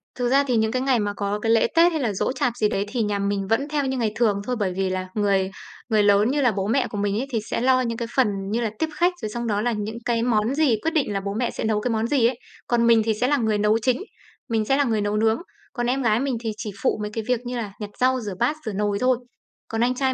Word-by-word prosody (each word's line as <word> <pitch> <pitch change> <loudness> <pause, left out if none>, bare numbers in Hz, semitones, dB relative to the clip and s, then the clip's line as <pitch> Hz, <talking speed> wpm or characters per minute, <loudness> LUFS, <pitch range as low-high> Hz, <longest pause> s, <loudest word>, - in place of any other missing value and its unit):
Thực 245 -1 -1
ra 275 +2 +4
thì 250 - +1
những 220 0 +1
cái 255 +1 -1
ngày 260 -2 +2
mà 205 -1 -1
có 205 0 -2
cái 225 +1 0
lễ, 225 0 +4
Tết 340 +1 +6
hay 315 -3 -2
là 225 -5 0
giỗ 190 - -1
chạp 250 -2 0
gì 210 - +2
đấy 200 0 -1
thì 235 +3 -2
nhà 205 -1 -1
mình 200 -1 -1
vẫn 225 +7 +1
theo 295 -2 0
như 265 0 -1
ngày 225 -3 0
thường 210 -4 +1
thôi. 250 +4 -2
Bởi 190 -3 0
vì 190 -1 0
là 185 0 -3
người 195 -2 +1 0.4
người 215 -2 +3
lớn 205 +3 +4
như 290 +1 +1
là 250 -3 +4
bố 195 -1 -2
mẹ 255 +4 +1
của 210 - -6
mình 205 0 0
ấy 265 - -3
thì 230 - 0
sẽ - - -1
lo 255 +1 +4
những 230 -2 -2
cái 235 -1 -3
phần 260 -4 +4 0.2
như 230 +2 0
là 230 - 0
tiếp 320 - 0
khách, 350 +1 +2
rồi 215 - -3
xong 235 +2 -4
đó 205 -2 0
là 240 +2 +1
những 215 +1 -4
cái 230 -1 +1
món 230 +1 +1
gì 295 -6 +3
quyết 325 - 0
định 285 -10 +1
là 195 - 0
bố 200 0 -3
mẹ 235 +3 -1
sẽ - - -5
nấu 215 -1 +1
cái 245 - -1
món 225 0 0
gì 255 -3 +3
ấy. 245 0 -3 0.3
Còn 235 -1 +2
mình 230 -1 +6
thì 225 - +2
sẽ 230 +4 0
là 290 +2 +2
người 220 -4 +1
nấu 210 +1 +3
chính, 255 +2 +1 0.5
mình 225 -2 +1
sẽ 270 +5 +2
là 285 - +3
người 225 -5 0
nấu 205 +1 0
nướng. 220 +3 +2 0.3
Còn 240 -2 -2
em 265 +2 0
gái 225 -3 +2
mình 265 -2 -1
thì 225 -1 -3
chỉ 210 - -5
phụ - - +1
mấy 210 0 -4
cái 225 - -3
việc 250 -2 +1
như 245 0 -3
là 215 -4 -4
nhặt 210 -2 -5
rau, 255 0 +3
rửa 205 -4 -5
bát, 245 +6 +2
rửa 215 - -3
nồi 205 0 0
thôi. 255 0 +3 0.5
Còn 225 0 -2
anh 250 +1 +2
trai 265 0 +1
230 Hz, 310 wpm, -23 LUFS, 210-255 Hz, 0.5 s, Tết